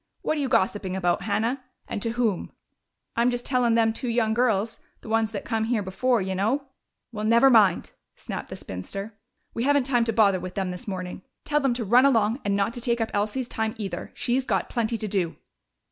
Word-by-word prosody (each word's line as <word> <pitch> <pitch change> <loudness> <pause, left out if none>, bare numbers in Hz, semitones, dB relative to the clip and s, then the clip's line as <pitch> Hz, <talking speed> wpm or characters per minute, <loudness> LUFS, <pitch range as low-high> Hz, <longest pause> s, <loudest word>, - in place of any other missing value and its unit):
"What - - 0
are 295 - -1
you 270 - -1
gossiping 190 -2 +1
about, 175 -2 +1
Hannah? 225 +6 -1 0.2
And 205 - -4
to 230 +1 -1
whom?" 230 -6 -1 0.6
"I'm 235 +1 +3
just 245 0 -3
tellin' 245 -3 +2
them 225 -1 +3
two 250 - -4
young 230 -2 +1
girls 225 -2 +1 0.2
the - - -10
ones 225 -1 +1
that 200 -3 -5
come 220 -2 0
here 225 -2 0
before, 205 +4 +1
you 190 0 -2
know 220 +10 0 0.3
" - - -57
"Well, 210 -2 -5
never 235 +5 +5
mind!" 205 -7 +4 0.2
snapped - - -6
the - - -6
spinster. 195 - -7 0.4
"We 230 - -3
haven't 285 -1 +3
time 245 -3 +2
to 230 - +1
bother 205 -4 +4
with 185 0 -7
them 190 -2 -1
this 180 +7 -8
morning. 185 -2 -5 0.2
Tell 295 0 +2
them 270 -4 +1
to 235 -2 -2
run 245 +6 +6
along 230 0 +2
and 200 -1 0
not 200 +3 0
to 240 - -6
take 235 0 0
up 225 -1 -1
Elsie's 215 +5 -1
time, 220 -1 -2
either. 205 -3 -5
She's 255 +2 0
got - - -1
plenty 235 -1 -1
to 215 - -4
do." 185 -5 -1
225 Hz, 220 wpm, -25 LUFS, 200-245 Hz, 0.6 s, run